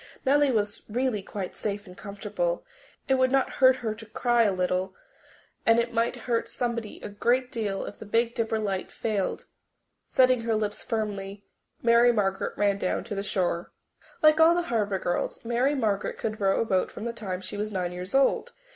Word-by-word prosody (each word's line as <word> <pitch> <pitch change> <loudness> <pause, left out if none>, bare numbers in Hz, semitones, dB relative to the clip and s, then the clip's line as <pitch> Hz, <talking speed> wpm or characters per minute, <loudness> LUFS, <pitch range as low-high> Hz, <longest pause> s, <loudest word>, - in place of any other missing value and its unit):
Nellie 285 +1 +4
was 210 -3 -1
really 240 -1 0
quite 190 -1 -6
safe 205 -1 -3
and 180 - -12
comfortable. 200 -4 -3 0.4
It 265 -1 +3
would 260 0 +3
not 270 -1 +2
hurt 260 0 +7
her 220 - 0
to 220 +1 -10
cry 240 +2 +2
a 205 - +3
little, 185 0 -1 0.7
and 225 0 +5
it 235 0 0
might 230 +1 +1
hurt 235 -2 0
somebody 235 -3 -3
a - - -5
great 245 +5 +1
deal 205 -5 -2
if - - -9
the 220 - -9
Big 230 +2 +1
Dipper 225 -1 -1
light 200 -3 -2
failed. 210 -4 -2 0.6
Setting 255 -2 +4
her 230 -1 0
lips 210 -1 -2
firmly, 205 -3 -3 0.4
Mary 235 +1 +6
Margaret 195 -4 -1
ran 200 -1 +2
down 185 - -1
to 230 - -6
the 195 - -2
shore. 180 -3 -1 0.5
Like 310 0 +6
all 325 +1 +7
the 350 0 -1
Harbour 205 -3 +1
girls, 175 +5 -2
Mary 245 +5 +1
Margaret 210 -6 -1
could 215 -1 -4
row 195 -1 +3
a - - +1
boat 190 -4 +1
from - - -7
the 235 - -2
time 190 -5 -4
she 185 +1 -6
was 210 +1 -3
nine 180 -3 -2
years 180 +5 -6
old. 270 0 +2
215 Hz, 190 wpm, -27 LUFS, 195-240 Hz, 0.7 s, hurt